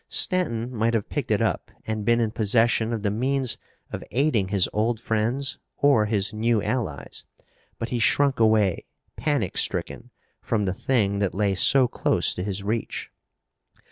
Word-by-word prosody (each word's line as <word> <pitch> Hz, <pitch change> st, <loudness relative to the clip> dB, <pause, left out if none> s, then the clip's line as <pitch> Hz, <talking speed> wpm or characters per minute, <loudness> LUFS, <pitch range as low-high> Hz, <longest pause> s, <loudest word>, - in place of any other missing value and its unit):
Stanton 125 Hz, -, 0 dB
might 115 Hz, +1 st, +1 dB
have 105 Hz, -, -2 dB
picked -, -, -3 dB
it -, -, +2 dB
up -, -, -1 dB, 0.2 s
and 110 Hz, -1 st, -3 dB
been 115 Hz, +2 st, +3 dB
in 115 Hz, -2 st, 0 dB
possession 115 Hz, +1 st, +2 dB
of 110 Hz, -3 st, -3 dB
the 100 Hz, -, +1 dB
means 130 Hz, +3 st, 0 dB, 0.3 s
of -, -, -5 dB
aiding 125 Hz, -7 st, +1 dB
his 95 Hz, -2 st, +2 dB
old 110 Hz, +2 st, 0 dB
friends 120 Hz, +5 st, -1 dB, 0.2 s
or 125 Hz, -7 st, +4 dB
his 105 Hz, 0 st, -1 dB
new 115 Hz, +1 st, +1 dB
allies. 95 Hz, -, -3 dB, 0.5 s
But 115 Hz, -, -4 dB
he 120 Hz, -, -1 dB
shrunk 140 Hz, +1 st, +2 dB
away, 110 Hz, -5 st, +2 dB, 0.3 s
panic 140 Hz, -, -1 dB
stricken, -, -, -2 dB, 0.3 s
from 105 Hz, -3 st, -1 dB
the 95 Hz, -, -1 dB
thing 100 Hz, -3 st, 0 dB
that 100 Hz, -2 st, -1 dB
lay 100 Hz, -1 st, +1 dB
so 130 Hz, +7 st, +5 dB
close -, -, +1 dB
to -, -, -5 dB
his 100 Hz, 0 st, -3 dB
reach. 110 Hz, +2 st, -3 dB
110 Hz, 165 wpm, -24 LUFS, 105-120 Hz, 0.5 s, so